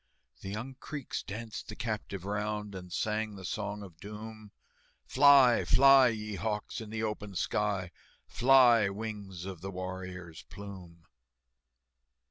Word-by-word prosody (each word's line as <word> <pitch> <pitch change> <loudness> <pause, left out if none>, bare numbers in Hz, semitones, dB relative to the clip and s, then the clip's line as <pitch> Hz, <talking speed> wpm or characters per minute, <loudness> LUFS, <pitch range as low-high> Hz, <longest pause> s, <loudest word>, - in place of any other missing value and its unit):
The 95 - -7
young 115 +7 -5
Creeks 145 -3 -5
danced 110 +2 -7
the 110 - -7
captive 110 -5 -4
round, 105 0 -3
And 90 -1 -8
sang 105 +2 -1
the 95 -2 -9
Song 105 0 -4
of 85 -5 -13
Doom, 105 +1 -9 0.5
"Fly, 135 -3 +6
fly, 135 -1 +7
ye 105 -3 -3
hawks, 105 +1 -3
in 110 - -8
the 110 +1 -3
open 105 -2 -4
sky, 95 +1 -1 0.3
Fly, 120 -4 +5
wings 100 -4 -6
of 95 -4 -7
the 95 - -5
warrior's 90 -2 -7
plume!" 90 -5 -10
105 Hz, 130 wpm, -31 LUFS, 95-110 Hz, 0.5 s, fly